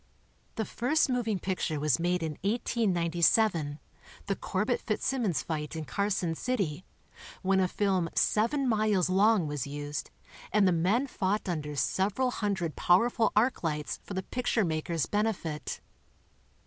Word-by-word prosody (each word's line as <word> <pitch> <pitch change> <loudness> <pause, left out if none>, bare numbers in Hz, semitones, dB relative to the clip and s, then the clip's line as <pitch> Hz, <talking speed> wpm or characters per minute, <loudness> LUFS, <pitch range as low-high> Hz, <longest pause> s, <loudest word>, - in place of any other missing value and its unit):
The 220 - -1
first 270 +6 +1
moving 230 -5 0
picture 180 -4 -2
was 150 -2 +2
made 175 0 0
in 160 - -1
1897 175 -6 +1 0.3
— - - -20
the 200 - -1
Corbett 210 +7 -1
Fitz 215 - -2
simmons 235 - 0
fight 155 -1 -4
in 160 -1 -4
Carson 195 -2 -1
City 185 -6 -2 0.3
— - - -16
when 190 0 +3
a 185 - +3
film 185 -3 0
seven 260 +6 +2
miles 210 -5 +2
long 200 -1 +4
was 145 -3 -3
used 145 +1 -5 0.4
and 210 -2 +4
the - - +4
men 185 +10 +2
fought 205 -6 -1
under 150 -4 -3
several 200 - +1
hundred 195 -8 -2
powerful 225 +5 +3
arc 235 +5 +2
lights 150 -2 -2
for 200 - -7
the 190 - -2
picture 240 -1 0
maker's 160 -1 -1
benefit. 205 -8 -2
190 Hz, 150 wpm, -29 LUFS, 165-220 Hz, 0.4 s, long